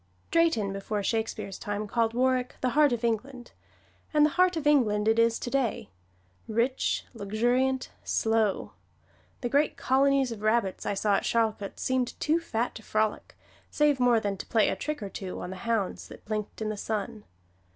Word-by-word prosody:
Drayton 320 Hz, -13 st, +2 dB
before 200 Hz, +1 st, -3 dB
Shakespeare's 220 Hz, -2 st, -2 dB
time 205 Hz, -1 st, -3 dB
called 230 Hz, +1 st, 0 dB
Warwick 255 Hz, 0 st, +1 dB
"the 255 Hz, -, +1 dB
heart 295 Hz, 0 st, +4 dB
of 240 Hz, -1 st, -2 dB
England," 240 Hz, +2 st, -2 dB, 0.6 s
and 300 Hz, -1 st, +5 dB
the 305 Hz, -, +1 dB
heart 365 Hz, 0 st, +3 dB
of 305 Hz, -, -3 dB
England 220 Hz, -8 st, +3 dB
it 225 Hz, +1 st, +3 dB
is 230 Hz, 0 st, +3 dB
today 245 Hz, -, -2 dB, 0.6 s
rich, 235 Hz, +4 st, 0 dB
luxuriant, 245 Hz, +5 st, 0 dB
slow. 220 Hz, -3 st, 0 dB, 0.7 s
The 245 Hz, -, -2 dB
great 285 Hz, +4 st, +2 dB
colonies 270 Hz, 0 st, +2 dB
of 220 Hz, -3 st, -7 dB
rabbits 215 Hz, -3 st, 0 dB
that -, -, -1 dB
I -, -, 0 dB
saw 205 Hz, +1 st, +2 dB
at -, -, -3 dB
Charlcote 220 Hz, -3 st, -1 dB
seemed 255 Hz, -1 st, -1 dB
too 315 Hz, +3 st, +2 dB
fat 240 Hz, -7 st, -2 dB
to -, -, -9 dB
frolic, 215 Hz, 0 st, -2 dB, 0.3 s
save 295 Hz, -2 st, +2 dB
more 245 Hz, -2 st, +4 dB
than 205 Hz, -2 st, -2 dB
to -, -, -7 dB
play 225 Hz, -3 st, +3 dB
a -, -, -1 dB
trick 300 Hz, -6 st, -4 dB
or 200 Hz, -, -5 dB
two 190 Hz, -1 st, -6 dB
on 180 Hz, -, -6 dB
the 190 Hz, -, -7 dB
hounds 220 Hz, -5 st, -1 dB
that -, -, -13 dB
blinked 215 Hz, 0 st, -4 dB
in 215 Hz, -, -2 dB
the 215 Hz, -, -4 dB
sun. 215 Hz, +1 st, -4 dB
230 Hz, 180 wpm, -28 LUFS, 215-260 Hz, 0.7 s, and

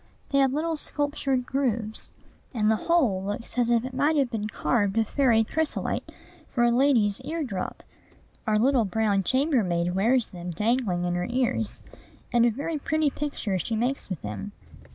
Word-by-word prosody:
They 275 Hz, -, +3 dB
have 270 Hz, -1 st, +4 dB
little 315 Hz, +3 st, -1 dB
sculptured 285 Hz, -4 st, -1 dB
grooves; 235 Hz, -5 st, -2 dB, 0.4 s
and 215 Hz, -1 st, +3 dB
the -, -, +4 dB
whole 260 Hz, -, +3 dB
looks 205 Hz, +4 st, -5 dB
as 240 Hz, -1 st, +2 dB
if 235 Hz, 0 st, +2 dB
it 260 Hz, -, -6 dB
might 290 Hz, +4 st, +2 dB
have 275 Hz, -4 st, +1 dB
been 215 Hz, -2 st, -2 dB
carved 210 Hz, -2 st, 0 dB
of 225 Hz, -1 st, +2 dB
fairy 240 Hz, -5 st, +3 dB
chrysolite 315 Hz, +7 st, -2 dB, 0.4 s
for 240 Hz, -, +1 dB
a 240 Hz, -, +4 dB
lady's 240 Hz, -4 st, +3 dB
ear 315 Hz, +4 st, -3 dB
drop. 195 Hz, -9 st, -5 dB, 0.6 s
Our 215 Hz, -1 st, +3 dB
little 250 Hz, +2 st, +3 dB
brown 205 Hz, 0 st, +1 dB
chambermaid 195 Hz, -, +1 dB
wears 230 Hz, +6 st, +3 dB
them 180 Hz, -2 st, -7 dB
dangling 210 Hz, 0 st, 0 dB
in 175 Hz, -, 0 dB
her 175 Hz, 0 st, -1 dB
ears; 240 Hz, -3 st, -1 dB, 0.5 s
and 240 Hz, 0 st, +5 dB
a -, -, +4 dB
very 290 Hz, +7 st, -3 dB
pretty 310 Hz, 0 st, +1 dB
picture 255 Hz, -11 st, -2 dB
she 225 Hz, +6 st, -2 dB
makes 245 Hz, +3 st, -1 dB
with 185 Hz, -5 st, -5 dB
them. 100 Hz, -1 st, -6 dB
235 Hz, 175 wpm, -26 LUFS, 205-275 Hz, 0.6 s, and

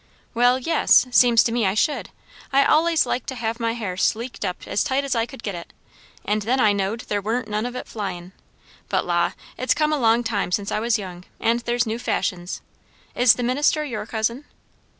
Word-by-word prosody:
"Well, 245 Hz, +2 st, +4 dB
yes; 300 Hz, 0 st, +4 dB
seems 240 Hz, -2 st, +6 dB
to 230 Hz, -, -1 dB
me 235 Hz, 0 st, 0 dB
I 190 Hz, -, 0 dB
should. 295 Hz, +7 st, 0 dB, 0.4 s
I 275 Hz, 0 st, +5 dB
allays 325 Hz, +1 st, +3 dB
liked 250 Hz, -, -3 dB
to 265 Hz, -, -4 dB
have 230 Hz, -1 st, -3 dB
my 230 Hz, -1 st, 0 dB
hair 210 Hz, -6 st, -4 dB
sleeked 230 Hz, +6 st, -1 dB
up 180 Hz, -2 st, -4 dB
as -, -, 0 dB
tight 270 Hz, +1 st, 0 dB
as 275 Hz, -2 st, -1 dB
I 230 Hz, -1 st, 0 dB
could 265 Hz, -2 st, -12 dB
get 200 Hz, -, -3 dB
it; 170 Hz, -1 st, -9 dB, 0.5 s
and 210 Hz, +1 st, 0 dB
then 245 Hz, +6 st, 0 dB
I 215 Hz, -4 st, +4 dB
knowed 200 Hz, +3 st, -2 dB
there 205 Hz, -3 st, -2 dB
warn't 225 Hz, +3 st, -2 dB
none 215 Hz, +2 st, -2 dB
of 245 Hz, -, -7 dB
it -, -, -6 dB
flyin'. 185 Hz, -4 st, -6 dB, 0.6 s
But -, -, 0 dB
la! 175 Hz, -1 st, +1 dB, 0.3 s
it's 255 Hz, -, +1 dB
a 305 Hz, -, +4 dB
long 240 Hz, -6 st, +2 dB
time 210 Hz, -5 st, -2 dB
since 200 Hz, +2 st, -1 dB
I -, -, 0 dB
was 230 Hz, +1 st, +1 dB
young, 180 Hz, -3 st, -8 dB
and 230 Hz, +1 st, +1 dB
there's 240 Hz, 0 st, 0 dB
new 225 Hz, +1 st, -3 dB
fashions. 180 Hz, -6 st, -2 dB, 0.5 s
Is 245 Hz, -1 st, +5 dB
the 245 Hz, -, -4 dB
minister 290 Hz, +5 st, +1 dB
your 215 Hz, -6 st, -5 dB
cousin?" 230 Hz, +5 st, -2 dB
230 Hz, 210 wpm, -23 LUFS, 205-250 Hz, 0.6 s, seems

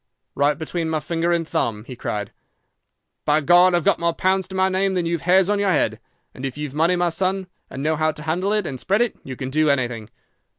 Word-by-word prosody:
"'"Right 145 Hz, +2 st, +2 dB
between 165 Hz, 0 st, -3 dB
my 160 Hz, -1 st, 0 dB
finger 170 Hz, +1 st, -1 dB
and 170 Hz, -2 st, 0 dB
thumb," 105 Hz, -7 st, -1 dB
he 125 Hz, +2 st, -9 dB
cried. 105 Hz, -3 st, -4 dB, 0.9 s
"By 150 Hz, +1 st, +3 dB
God! 175 Hz, +4 st, +5 dB
I've 175 Hz, -, +1 dB
got -, -, +2 dB
more 170 Hz, 0 st, 0 dB
pounds 190 Hz, 0 st, +1 dB
to 190 Hz, -, -9 dB
my 190 Hz, 0 st, +3 dB
name 190 Hz, 0 st, 0 dB
than 180 Hz, -2 st, 0 dB
you've 170 Hz, -1 st, -1 dB
hairs 185 Hz, +2 st, +4 dB
on 205 Hz, 0 st, +1 dB
your 200 Hz, -1 st, +1 dB
head. 185 Hz, -, +1 dB, 0.3 s
And 130 Hz, -, -10 dB
if 135 Hz, 0 st, -4 dB
you've 150 Hz, -2 st, -5 dB
money, 165 Hz, +4 st, +2 dB
my 175 Hz, 0 st, +1 dB
son, 190 Hz, +3 st, -1 dB, 0.2 s
and 135 Hz, -, -6 dB
know 155 Hz, +1 st, +1 dB
how 155 Hz, 0 st, +1 dB
to 150 Hz, -, -9 dB
handle 175 Hz, +5 st, -1 dB
it 210 Hz, -2 st, +1 dB
and 135 Hz, -5 st, -5 dB
spread 200 Hz, -, +1 dB
it, 240 Hz, -, 0 dB
you 130 Hz, -, -7 dB
can 130 Hz, +1 st, -5 dB
do 155 Hz, +2 st, +2 dB
_anything! 120 Hz, -6 st, 0 dB
165 Hz, 240 wpm, -22 LUFS, 145-185 Hz, 0.9 s, God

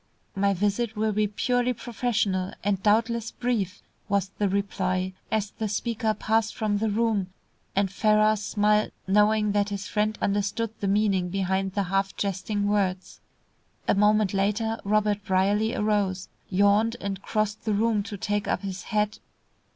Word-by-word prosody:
"My 200 Hz, 0 st, +2 dB
visit 210 Hz, +4 st, 0 dB
will 215 Hz, +1 st, +1 dB
be 210 Hz, 0 st, +1 dB
purely 245 Hz, +4 st, 0 dB
professional, 215 Hz, -6 st, -1 dB
and 200 Hz, -2 st, 0 dB
doubtless 225 Hz, +2 st, +2 dB
brief," 215 Hz, -7 st, -2 dB, 0.3 s
was 200 Hz, -2 st, +1 dB
the 205 Hz, -2 st, +2 dB
reply, 185 Hz, -1 st, -1 dB, 0.2 s
as 210 Hz, -2 st, 0 dB
the 220 Hz, -, -3 dB
speaker 220 Hz, +1 st, -1 dB
passed 220 Hz, +1 st, 0 dB
from 210 Hz, -2 st, 0 dB
the 220 Hz, +1 st, 0 dB
room, 215 Hz, -3 st, +1 dB, 0.5 s
and 195 Hz, -1 st, +1 dB
Ferrars 215 Hz, +1 st, +3 dB
smiled, 210 Hz, +1 st, +1 dB
knowing 210 Hz, +2 st, +3 dB
that 205 Hz, 0 st, +1 dB
his 200 Hz, 0 st, -4 dB
friend 215 Hz, 0 st, 0 dB
understood 205 Hz, +2 st, -1 dB
the 200 Hz, -, -1 dB
meaning 195 Hz, -3 st, +2 dB
behind 190 Hz, 0 st, -1 dB
the 200 Hz, 0 st, 0 dB
half 195 Hz, +1 st, -1 dB
jesting 200 Hz, +1 st, -1 dB
words. 190 Hz, -3 st, -1 dB, 0.7 s
A -, -, +4 dB
moment 210 Hz, 0 st, +3 dB
later 210 Hz, +3 st, 0 dB
Robert 210 Hz, 0 st, +1 dB
Brierly 200 Hz, +4 st, +1 dB
arose, 200 Hz, -3 st, 0 dB, 0.2 s
yawned, 205 Hz, +4 st, +3 dB
and 195 Hz, -1 st, -4 dB
crossed 215 Hz, -1 st, -1 dB
the 215 Hz, -, 0 dB
room 220 Hz, 0 st, +2 dB
to 205 Hz, 0 st, -6 dB
take 205 Hz, +1 st, -1 dB
up 185 Hz, -, -1 dB
his 190 Hz, -1 st, -4 dB
hat. 210 Hz, -1 st, 0 dB
205 Hz, 150 wpm, -26 LUFS, 195-215 Hz, 0.7 s, A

